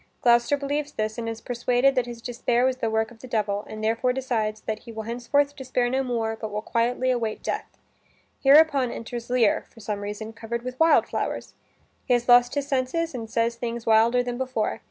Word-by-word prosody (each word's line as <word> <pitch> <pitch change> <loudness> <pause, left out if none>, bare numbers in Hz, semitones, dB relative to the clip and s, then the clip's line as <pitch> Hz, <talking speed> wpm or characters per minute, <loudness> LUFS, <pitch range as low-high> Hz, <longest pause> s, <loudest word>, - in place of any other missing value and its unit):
Gloucester 240 +3 +4
believes 290 +1 -3
this, 215 +1 -2
and 230 -1 -3
is 225 0 -6
persuaded 245 +2 +2
that 250 -2 0
his 235 -1 -8
despair 245 0 0
was 260 -1 +1
the 230 - -1
work 220 +1 0
of 230 - -16
the 255 - -10
devil, 210 -3 -1
and 215 0 -7
therefore 230 +3 +1
decides 225 -5 -2
that 215 0 -4
he 235 - -11
will 220 -1 -6
henceforth 265 +5 0
despair 255 -3 -1
no 265 +1 +1
more, 230 -3 -1
but 220 -1 -6
will 210 +1 -4
quietly 245 +3 +1
await 230 -3 -2
death. - - -3 0.7
Hereupon 280 -2 +5
enters 235 +1 -6
Lear, 245 -4 +2
for - - -17
some 210 -1 -4
reason 210 +2 -6
covered 235 +1 -5
with 255 0 -6
wild 325 0 +5
flowers. - - -3 0.5
He 250 - +1
has 240 0 -2
lost 245 +1 +6
his 285 -1 -1
senses 285 +4 -1
and 230 -3 -6
says 230 +1 0
things 235 0 -4
wilder 230 +2 +4
than 245 0 -4
before. 255 -4 -1
240 Hz, 205 wpm, -25 LUFS, 225-255 Hz, 0.7 s, lost